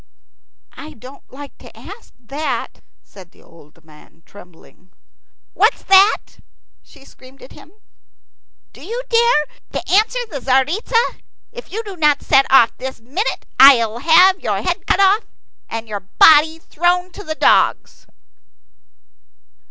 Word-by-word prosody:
"I 305 +3 -12
don't 255 +4 -16
like 280 +1 -12
to - - -17
ask 430 +3 -14
that," 280 +6 -6 0.2
said 185 -3 -17
the - - -25
old 160 -2 -22
man, 155 +1 -21
trembling. 180 -1 -19 0.6
"What's - - 0
that?" 390 +2 +2 0.4
she 275 -3 -21
screamed 260 0 -19
at - - -15
him. - - -17 1.0
"Do - - -17
you 470 +8 -6
dare 465 -10 +1 0.2
to - - -6
answer 435 +5 +2
the 285 - -6
Tzaritza? 305 - -1 0.3
If 485 +1 -12
you 445 +4 -5
do 400 -3 -10
not 300 -4 0
set 270 0 +2
off 245 -4 +4
this 260 0 -8
minute, 290 - -5
I'll 235 -4 +5
have 365 +6 +4
your - - -4
head - - -4
cut - - 0
off 395 +3 +2 0.4
and 225 0 -7
your 210 -2 -6
body 310 +10 +3
thrown 355 +3 -2
to 410 - -12
the 315 -4 -6
dogs." - - 0
295 Hz, 135 wpm, -17 LUFS, 245-385 Hz, 1.0 s, I'll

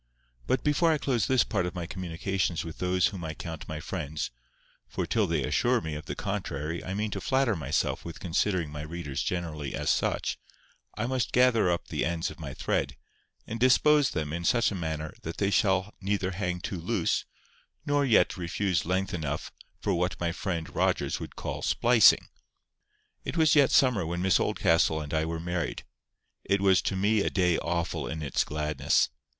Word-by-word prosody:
But 130 - +1
before 150 +3 +3
I 155 - +2
close 125 -7 0
this 130 -2 +4
part 90 - -1
of 90 - -6
my 90 -1 -3
communications 90 0 -2
with 80 - -8
those 90 0 +2
whom 90 -3 -6
I 80 0 -4
count 80 -2 -7
my 80 -1 -5
friends, 80 -2 -4 0.6
for - - -3
till - - +1
they - - 0
assure - - +2
me 80 -1 -5
of 75 0 -7
the - - -4
contrary 75 +4 -3
I 95 - -4
mean 105 +1 -1
to 100 - -4
flatter 130 -2 +2
myself 75 -3 -1
with 85 - -8
considering 90 -2 0
my 75 0 -6
readers 75 -3 -4
generally 80 -6 -3
as - - +1
such, - - 0 0.6
I 110 - -1
must 130 0 -1
gather 125 -6 +4
up 85 -1 -1
the - - -1
ends 80 0 -1
of - - -13
my - - -6
thread, - - -1 0.5
and 115 +1 -5
dispose 140 +3 +5
them 75 -2 -3
in 85 +1 -3
such 120 +6 +3
a - - -3
manner 80 -4 -4
that 80 - -6
they 100 0 +1
shall 95 0 +2
neither 95 -1 0
hang 90 -1 -3
too 95 - -4
loose, 95 -1 0 0.6
nor 145 0 +2
yet 120 -7 +3
refuse 90 -1 -1
length 95 +2 0
enough 75 -4 -3 0.3
for 100 - 0
what 90 0 -1
my 85 -1 0
friend 85 -3 -4
Rogers - - +1
would - - -8
call - - -4
splicing. 115 -3 +5 1.0
It - - -4
was 160 -1 +5
yet 140 -3 +6
summer 125 -8 +4
when 85 +2 -2
Miss 95 -1 +4
Oldcastle 80 -1 +2
and 75 0 -6
I 80 0 +1
were 80 0 -3
married. 85 -1 -3 0.6
It 100 +1 +1
was 95 -1 +4
to - - -2
me 105 +3 +2
a - - +1
day 90 -3 +2
awful 85 0 -2
in 80 0 -4
its 70 - +1
gladness. 75 -2 +1
90 Hz, 190 wpm, -28 LUFS, 80-105 Hz, 1.0 s, yet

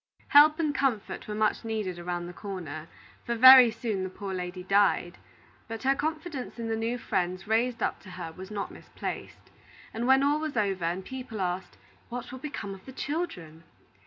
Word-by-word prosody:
Help 300 +1 +7
and 310 -3 0
comfort 265 -7 -1
were 210 - -4
much 215 +2 +1
needed 215 -6 -3
around 175 0 -3
the 175 - -8
corner; 170 -6 -6 0.4
for 235 - -2
very 255 0 +10
soon 220 -3 -3
the 185 - -3
poor 195 +1 -6
lady 180 0 -5
died. 195 -2 +2 0.5
But 225 -1 -6
her 270 +1 +4
confidence 310 -2 -4
in 230 -1 -4
the 225 - 0
new 230 +2 -1
friends 185 -4 -2
raised 230 +2 +1
up - - -1
to 185 - -14
her 175 -3 -7
was 185 +3 -10
not 205 -2 -4
misplaced; - - -7 0.4
and 230 +2 -2
when 265 +1 +5
all 290 +2 +3
was 310 -5 -4
over, 195 -5 0
and 180 +3 -2
people 255 -4 -7
asked, 180 0 -3 0.3
"What 245 0 -6
will 260 - -7
become 220 -8 -5
of 190 +3 -13
the - - -7
children?" 200 - -4
220 Hz, 190 wpm, -28 LUFS, 185-260 Hz, 0.5 s, very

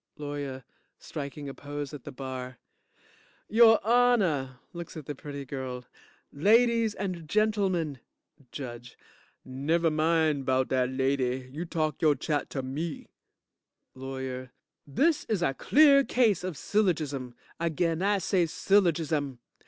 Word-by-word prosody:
LAWYER 145 -3 -5 0.3
(Striking 145 0 -7
a 135 - -5
pose 145 0 -6
at 145 -4 -9
the - - -6
bar) 130 -1 -6 0.9
Your 225 0 +6
Honor, 205 - +3 0.2
(Looks 170 -1 -8
at 155 - -8
the 145 - -4
pretty 140 0 -7
girl) 130 -2 -5 0.5
Ladies 225 +6 +3
and 180 -5 -5
Gentlemen 195 -9 +1 0.5
JUDGE 120 -3 -8 0.5
Never 155 +6 0
mind 155 -2 +2
'bout 130 0 +2
dat 130 -1 +1
lady. 130 -1 0
You 165 +4 -4
talk 155 -3 -2
yo' 155 -3 +4
chat 150 -1 -2
to 135 - -4
me. 145 +5 -5 0.8
LAWYER 130 -1 -6 0.4
This 295 - +1
is 205 -6 -1
a 135 - +1
clear 280 - +5
case 225 -9 +2
of 180 -5 -4
syllogism! 150 - -1 0.2
Again 165 0 0
I 200 +1 +2
say 185 -2 +1
syllogism. 160 -7 +1
150 Hz, 125 wpm, -28 LUFS, 135-185 Hz, 0.9 s, Your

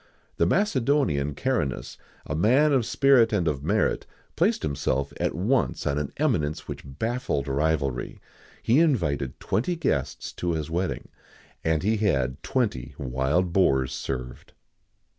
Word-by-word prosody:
[XIX - - -34
69] - - -39
The - - +3
Macedonian, 130 - +1
Caranus, 95 - -2 0.3
a 75 - -3
man 130 - +4
of 125 -4 +2
spirit 135 -5 +4
and 95 -6 +1
of 70 -3 -1
merit, - - +1 0.3
placed - - +1
himself 70 -2 -1
at - - 0
once 115 +8 0
on 70 0 0
an 75 - -3
eminence 95 - 0
which - - -6
baffled 75 - -2
rivalry. 70 -3 -1 0.4
He 120 +6 +4
invited 85 - +1
twenty 175 +11 -1
guests 70 - -2
to 85 -1 -2
his 80 0 -3
wedding, 90 +3 -2 0.5
and 80 -1 +1
he 110 +3 +2
had 70 -11 0
twenty 115 - -2
wild 70 +7 0
boars 65 -9 +2
served. 65 -1 -5
80 Hz, 140 wpm, -26 LUFS, -, 0.5 s, man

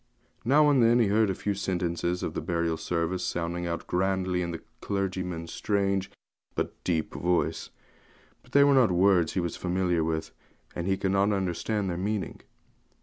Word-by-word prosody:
Now 145 +5 +5
and 140 -3 +4
then 115 +1 +5
he 115 -4 +3
heard 110 0 +3
a 95 - -1
few 100 - -2
sentences 90 -2 -2
of - - -3
the - - -3
burial 85 0 -1
service 85 +2 -2
sounding 85 +1 -2
out 85 0 -3
grandly 95 0 0
in 85 - -2
the 85 -1 -6 0.2
clergyman's 90 -4 -3
strange, 100 -2 0 0.7
deep 80 -3 -1
voice; 90 0 0 0.7
but - - -23
they 140 - +7
were 140 0 +5
not 130 -5 +5
words 90 -2 +3
he - - 0
was 85 -1 -2
familiar 90 -2 0
with, 80 0 -2 0.4
and 85 +1 -3
he 95 0 +1
could 95 - -1
not 100 +1 +3
understand 100 +2 -1
their 85 -2 -2
meaning. 105 +1 -3
95 Hz, 170 wpm, -28 LUFS, 85-100 Hz, 0.7 s, they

